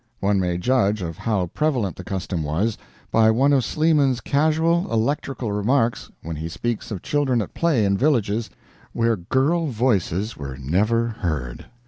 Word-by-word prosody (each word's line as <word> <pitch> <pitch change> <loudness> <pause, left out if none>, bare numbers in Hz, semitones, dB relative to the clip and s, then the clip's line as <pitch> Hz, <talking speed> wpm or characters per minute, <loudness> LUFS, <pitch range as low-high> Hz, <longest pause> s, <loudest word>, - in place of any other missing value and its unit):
One 100 0 +1
may 90 -2 0
judge 105 -1 +1
of 85 -1 -4
how 105 -5 0
prevalent 130 - 0
the 90 - -8
custom 95 -2 -3
was, 85 +9 -1 0.4
by 110 0 +5
one 135 +6 +3
of 135 -3 +3
Sleeman's 150 -5 +2
casual 160 +6 +1
electrical 120 0 -1
remarks, 115 +4 0
when 80 -1 -5
he 80 +2 -4
speaks 110 +7 -3
of 100 -6 -5
children 140 -5 +1
at 105 - -4
play 155 -11 +2
in 100 0 +1
villages 115 -6 +1 0.4
where 115 0 +2
girl 135 - 0
voices 110 - 0
were 70 -2 -7
never 105 - +1
heard! 75 - -4
110 Hz, 155 wpm, -22 LUFS, 95-135 Hz, 0.4 s, by